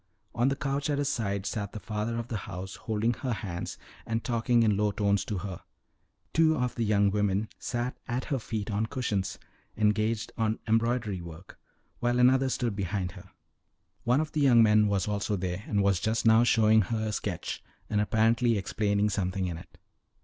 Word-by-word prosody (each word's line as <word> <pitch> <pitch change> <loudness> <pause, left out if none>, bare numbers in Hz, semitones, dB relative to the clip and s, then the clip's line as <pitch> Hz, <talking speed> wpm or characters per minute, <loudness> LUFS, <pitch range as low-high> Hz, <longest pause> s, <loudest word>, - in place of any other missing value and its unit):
On 120 +2 +2
the 135 - 0
couch 140 +1 -2
at 145 - +1
her 145 - +1
side 100 -8 -1
sat 100 -2 -3
the 110 - -5
father 105 +3 -3
of 115 0 -4
the 120 - -4
house, 95 +1 -6
holding 110 +2 -1
her 125 +2 -3
hand 90 -5 -5 0.3
and 115 0 -2
talking 120 -1 +2
in 105 -2 +3
low 105 +1 +2
tones 100 -1 +1
to 105 - -3
her; 90 -1 -6 0.7
two 160 -1 +4
of 125 -1 -1
the 120 - -2
young 100 -2 +3
women 105 +1 0
sat 120 0 -3
at 125 +1 -2
her 135 - +1
feet 110 -2 -4
on 105 +2 0
cushions, 105 -7 -2 0.4
engaged 110 +1 +1
on 110 0 +1
embroidery 115 -3 +1
work, 85 +2 -11 0.4
while 120 0 +1
another 130 +2 +4
stood 120 -4 -1
behind 95 -1 -2
her; - - -13 0.7
one 125 +4 +3
of 155 0 -2
the 150 - -1
young 120 -5 +6
men 105 -1 +5
was 100 -2 0
also 105 0 -1
there, 90 +1 -3
and 100 -2 +1
was 100 -3 +3
just 110 +4 -1
now 110 +1 +6
showing 110 -2 +5
her 110 +2 -2
a - - -2
sketch, - - -4 0.2
and 105 -1 +1
apparently 115 +2 +2
explaining 100 +1 0
something 95 -2 -1
in 90 -2 -3
it. 85 - -12
110 Hz, 190 wpm, -28 LUFS, 100-120 Hz, 0.7 s, young